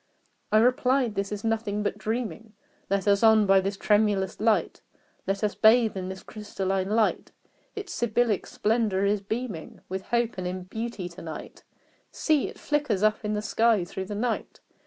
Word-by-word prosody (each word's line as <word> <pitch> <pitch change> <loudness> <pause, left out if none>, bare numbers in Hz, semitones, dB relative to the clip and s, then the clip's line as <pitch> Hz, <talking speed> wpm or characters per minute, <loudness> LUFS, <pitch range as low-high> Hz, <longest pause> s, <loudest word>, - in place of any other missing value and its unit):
I 215 - +5
replied 250 +1 +3
"This 200 0 -3
is 210 -1 -4
nothing 220 -2 -1
but 205 0 -2
dreaming: 220 -1 -4 0.4
Let 200 +1 0
us 200 -1 +4
on 220 -2 +6
by 195 0 +5
this 195 +1 -3
tremulous 205 -3 +1
light! 220 0 +1 0.5
Let 195 +1 -1
us 210 - +1
bathe 220 0 +4
in 185 -1 -4
this 190 0 -7
crystalline 195 -2 -3
light! 220 0 +1 0.4
Its 405 -3 -6
Sibyllic 235 -3 0
splendor 210 -3 +1
is 200 0 +1
beaming 215 -4 -5
With 190 +1 -5
Hope 235 -4 0
and 180 - -3
in 185 0 -4
Beauty 220 -1 -5
to 170 - -12
night: 160 -1 -8 0.5
See! 310 -4 +1
it - - -10
flickers 290 -10 0
up 215 0 +3
the 210 -1 -2
sky 220 -3 +2
through 190 +2 -5
the 205 - -5
night! 230 +2 -2
210 Hz, 170 wpm, -26 LUFS, 195-230 Hz, 0.5 s, on